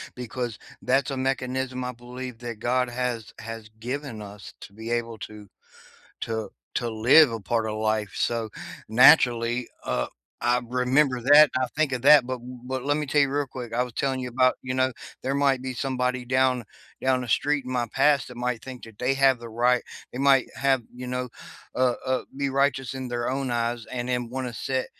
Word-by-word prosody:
because 120 -2 -4 0.2
that's 135 +3 +1
a 135 - -3
mechanism 130 -1 -2
I 125 - -3
believe 125 0 -8
that 120 -3 -6
God 125 +2 +1
has 120 -2 -3
has 115 -1 -8
given 125 -1 -5
us 100 0 -10
to 100 - -11
be 110 +2 -8
able 115 -1 -2
to 105 -1 -9 0.8
to 110 -1 -3 0.3
to 120 -1 -1
live 125 +7 +6
a 115 - -4
part 110 +3 -1
of 105 - -3
life, 110 -2 0
so, 115 -2 -1 0.4
naturally, 120 -1 +5 0.2
uh, 60 - -1 0.3
I 125 +1 +2
remember 125 +2 +2
that, 145 +4 +8
I 130 0 +1
think 155 -2 +2
of 130 -2 -3
that, 140 -2 +8
but 130 - -3
w 125 +1 -10
but, 130 0 -4
let 145 +1 +2
me 150 0 -2
tell 145 +2 +2
ya 140 - +2
real 145 +1 -1
quick, 125 -2 -7
I 125 - +2
was 125 -2 -6
telling 135 0 -1
you 125 - -4
about, 130 +1 +3
you 130 0 -3
know, 130 0 +2 0.3
there 135 - 0
might 140 -2 +2
be 130 -1 -5
somebody 125 -1 -1
down 130 0 +2 0.4
down 130 -1 +2
the - - -5
street 145 +4 +1
in 130 - -5
my 120 -2 0
past 140 0 +3
that 125 - -11
might 125 -2 -2
think 130 -2 -9
that 115 -2 -14
they 125 +2 +2
have 135 -2 +3
the 120 - -8
right 120 +2 +2 0.3
they 125 - -6
might 135 -1 +4
have, 135 -2 +2
you 125 0 -7
know 125 0 -2 0.5
uh 125 -1 +2
uh, 130 0 +1
be 140 0 0
righteous 135 -2 +1
in 130 -1 -5
their 120 0 -2
own 135 0 -2
eyes 120 -1 -1
and 125 -1 -4
then 125 -1 -1
wanna 130 -1 -4
sit 130 +2 -2
125 Hz, 205 wpm, -25 LUFS, 120-130 Hz, 0.8 s, that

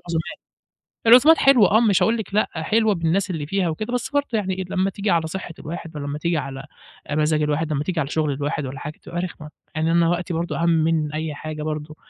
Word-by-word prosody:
العزومات، 170 +2 -4 0.7
العزومات 270 +8 +8
حلوة 250 -9 +5
آه 220 - +6
مش 205 -5 +3
هاقول 230 +1 +2
لِك 205 -3 -6
لأ 210 - +2
حلوة 210 +6 +1
بالناس 170 +4 0
اللي 155 -5 -3
فيها 185 +1 0
وكده، 215 +10 -4
بس 245 0 -2
برضه 285 0 +1
يعني 195 -4 0
إيه، 185 0 -4
لمّا 190 0 +1
تيجي 200 +1 -3
على 165 -1 +2
صحة 175 0 -6
الواحد 165 0 -7
ولمّا 145 0 -4
تيجي 170 +1 0
على 135 0 -5 0.4
آآ، 145 - -3
مزاج 155 0 +2
الواحد، 150 +1 0
لمّا 145 +1 -1
تيجي 175 0 -2
على 140 -2 -1
شغل 155 -2 0
الواحد 145 +1 -2
والّا 135 +2 -6
حاجة 150 +1 -7
بتبقى 170 - -6
رخمة، 155 -4 -7 0.3
يعني 160 +1 +1
أنا 170 0 +3
وقتي 175 0 -1
برضه 170 +1 -2
أهَم 170 - +3
من 160 -2 +1
أي 155 0 -3
حاجة 155 0 -6
برضه، 155 0 -4
165 Hz, 230 wpm, -22 LUFS, 155-195 Hz, 0.7 s, العزومات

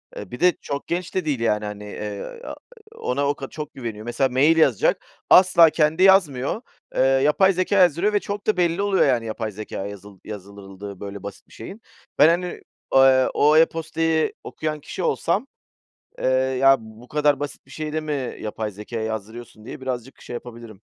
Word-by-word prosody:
Eee, 105 0 -8
bir 125 - -7
de 180 +1 +5
çok 140 0 -5
genç 175 +2 -3
de 185 - 0
değil 140 -6 -1
yani, 105 -2 0
hani, 105 0 -7
eee, 105 - -7
a - - -6 0.4
ona 140 - -1
o 145 - 0
ka 135 - -7
çok 150 -1 -7
güveniyor. 115 -4 -7
Mesela 125 +3 0
mail 145 +6 +3
yazacak, 135 -9 +2 0.2
asla 180 -3 +7
kendi 160 +3 +2
yazmıyor. 185 - +3 0.3
Eee, - - +2
yapay 150 +9 +4
zekâya 185 +2 +2
yazdırıyor 180 +5 +2
ve 205 - +3
çok 205 +1 -6
da 215 - +2
belli 175 +2 +1
oluyor 200 -2 +3
yani 120 -4 +1
yapay 110 0 -4
zekâ 100 -1 -6
yazıl 100 -1 -11
yazdırıldığı 100 -1 -9
böyle 100 0 -8
basit 100 - -9
bir - - -20
şeyin. 210 +4 -10 0.4
Ben, 150 - +8
hani, 175 +1 -1 0.3
eee, 130 -1 +6
o 150 +2 +4
e-posta’yı 160 0 +1
okuyan 155 -1 -4
kişi - - -6
olsam, - - 0 0.7
eee, - - -2 0.3
ya 135 0 +6
bu 110 +2 -14
kadar 145 -2 +1
basit 145 - -6
bir - - -20
şeyi 155 -1 -5
de 155 - -1
mi 145 -4 -4
yapay 110 0 -4
zekâya 105 +3 -6
yazdırıyorsun 110 +1 -7
diye 130 - -9
birazcık 130 0 -5
şey - - -8
yapabilirim. 115 -4 -9
135 Hz, 185 wpm, -23 LUFS, 110-160 Hz, 0.7 s, Ben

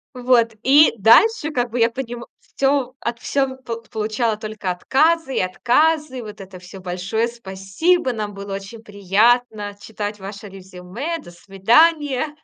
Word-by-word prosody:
Вот. 240 -3 +2
И 290 +4 +6
дальше, 310 - +4
как 245 -3 -1
бы, 240 +2 -4
я 230 0 +4
понима 240 -1 -6
всё 270 -2 -1
от 235 0 -4
всё 275 +1 0
в 260 - -8
пол 230 0 -6
получала 220 0 -1
только 215 -3 -4
отказы 290 - +1
и - - +1
отказы. 260 - +1
Вот 210 -2 -10
это 190 -1 -11
всё: 185 +2 -12
"Большое 190 +6 -2
спасибо. 235 - -1
Нам 210 -3 -5
было 200 0 -6
очень 200 +3 -9
приятно 210 +1 +1
читать 210 -1 -6
ваше 200 +2 -9
резюме, 190 - -7
до 175 - -13
свидания". 265 - +2
230 Hz, 150 wpm, -20 LUFS, 200-265 Hz, -, И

